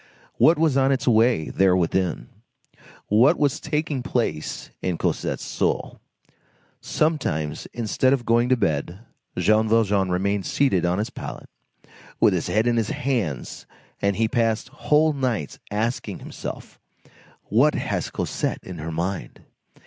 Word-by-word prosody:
What 165 - +6
was 155 -4 +2
on 135 0 +3
its 135 - -1
way 115 -7 +3
there 95 -1 +3
within? 90 0 -1 0.8
What 125 - +4
was 145 -3 +1
taking 150 -3 -2
place 115 - -2
in 90 -2 -1
Cosette's - - -2
soul? - - -2 0.8
Sometimes, 80 - -1
instead 120 +3 +1
of 130 -3 +1
going 120 +2 +3
to 130 - +4
bed, 85 +1 -1 0.4
Jean 110 +1 +3
Valjean 105 -4 +2
remained 95 +2 0
seated 95 -12 +2
on 90 +1 +1
his 105 +2 -2
pallet, - - -8 0.7
with - - +5
his - - -1
head 110 +2 +1
in 120 -1 +2
his 110 -2 0
hands, 115 - -3 0.3
and 100 0 +1
he 115 +2 +1
passed 115 0 0
whole 150 +2 +2
nights 125 - -2
asking 110 +4 -2
himself: - - -8 0.6
"What 135 +8 +3
has - - -2
Cosette - - -3
in 90 -3 -8
her 80 +2 -5
mind?" 90 +4 -4
110 Hz, 140 wpm, -23 LUFS, 95-130 Hz, 0.8 s, What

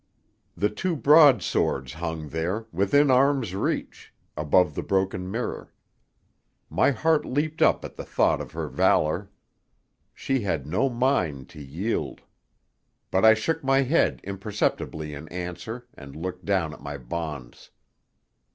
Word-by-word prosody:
The 105 +4 +1
two 170 - -2
broadswords 140 - +4
hung 80 -1 -5
there, 90 +9 -2
within 115 - +3
arm's 130 -5 +3
reach, 95 - -3 0.2
above 75 +2 +2
the - - -3
broken 95 -1 -1
mirror. 115 +5 -4 1.0
My - - +3
heart 155 +4 +2
leaped 150 +4 -2
up - - +3
at - - -10
the - - -5
thought - - +1
of - - -9
her - - -3
valour. 90 +6 +1 0.9
She 135 -1 -1
had 80 -9 -2
no 95 - +1
mind 115 - 0
to 75 - -11
yield! 80 +12 -3 0.9
But 95 - +2
I 110 0 +8
shook 160 +9 -2
my 135 0 +3
head 135 +6 +1
imperceptibly 95 -6 -3
in 75 +2 -8
answer, 90 +7 -6
and 70 -1 -12
looked 90 +3 -6
down 95 -6 0
at - - -13
my 70 0 -6
bonds. 70 -1 -7
95 Hz, 135 wpm, -25 LUFS, 80-130 Hz, 1.0 s, I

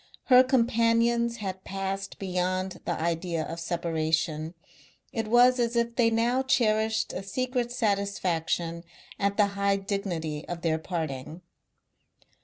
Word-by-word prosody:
Her 250 +1 +9
companions 235 -1 +2
had 190 -4 -5
passed 195 0 -4
beyond 185 0 -2
the - - -2
idea 165 0 -1
of 165 +2 -6
separation; 160 -1 -1 0.6
it 225 -2 -2
was 245 +2 +5
as 235 0 0
if 235 0 0
they 235 -2 +4
now 235 +3 +2
cherished 220 -4 +1
a - - -4
secret 250 +4 -2
satisfaction 185 -7 -1 0.4
at 200 0 0
the 210 - +5
high 200 0 +2
dignity 185 -6 -3
of 175 -1 -6
their 160 -1 +1
parting. 160 -1 -5
195 Hz, 125 wpm, -27 LUFS, 170-230 Hz, 0.6 s, Her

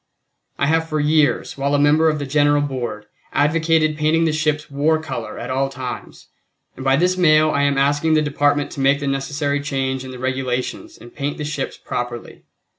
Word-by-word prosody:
I - - +1
have 160 +2 +1
for 155 -1 -1
years, 150 -2 +1
while 140 +1 +1
a - - +2
member 150 +2 +4
of 155 - -1
the 145 - -4
General 145 +1 +2
Board, 120 -6 -4 0.3
advocated 155 0 +2
painting 160 +2 +2
the 160 - +1
ships 150 -1 -1
war 150 +3 +2
color 120 -9 -6
at - - -5
all 135 +1 0
times, 130 -2 -8 0.5
and 130 - -8
by 135 0 +3
this 180 +5 +1
mail 155 -3 +4
I 140 - +1
am 140 -1 +2
asking 145 +3 +2
the 155 - +3
Department 145 0 +1
to - - -8
make 135 +1 +3
the 145 - -4
necessary 140 +1 -1
change 135 -2 -2
in 130 - -8
the 130 - -8
Regulations 130 0 -3
and 120 - -14
paint 145 +1 -3
the 150 - -4
ships 145 -2 -4
properly. 120 -1 -6
145 Hz, 195 wpm, -20 LUFS, 135-155 Hz, 0.5 s, member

